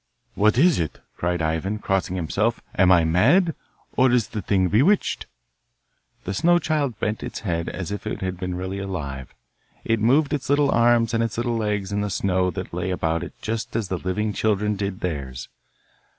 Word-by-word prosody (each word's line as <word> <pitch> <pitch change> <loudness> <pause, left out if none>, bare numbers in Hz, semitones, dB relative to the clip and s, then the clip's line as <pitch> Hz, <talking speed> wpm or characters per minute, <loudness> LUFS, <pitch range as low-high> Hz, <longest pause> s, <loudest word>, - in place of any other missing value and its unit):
'What 105 +2 +3
is 165 - +5
it?' 80 -3 -3 0.2
cried 90 -1 -1
Ivan, 80 +6 -1
crossing 95 -3 -1
himself. 100 +7 0 0.2
'Am 95 -1 +5
I 85 -2 +6
mad, 135 - +4 0.4
or 130 0 +4
is 120 -3 +2
the 105 - -4
thing 95 0 +2
bewitched?' 140 - +2 1.0
The 95 - -3
snow 175 - +4
child 150 - -1
bent 105 +1 -1
its - - -6
head 85 -5 -2
as 95 -2 -5
if 105 - -5
it - - -3
had 95 -1 -3
been 90 -1 -3
really 95 +2 -4
alive. 70 -10 -5 0.5
It 115 -1 +1
moved 140 +7 +3
its 140 -2 -3
little 145 0 +3
arms 115 0 +3
and 115 - +2
its 115 -1 -3
little 120 0 0
legs 105 -3 -1
in 100 0 0
the 105 - -1
snow 95 -1 +1
that 90 -1 -6
lay 90 +2 -2
about 85 -3 0
it - - -10
just 110 0 -3
as 110 -5 -1
the 95 - -2
living 105 +3 -1
children 105 0 +1
did 100 -1 -4
theirs. 65 -7 -4
100 Hz, 190 wpm, -23 LUFS, 90-115 Hz, 1.0 s, I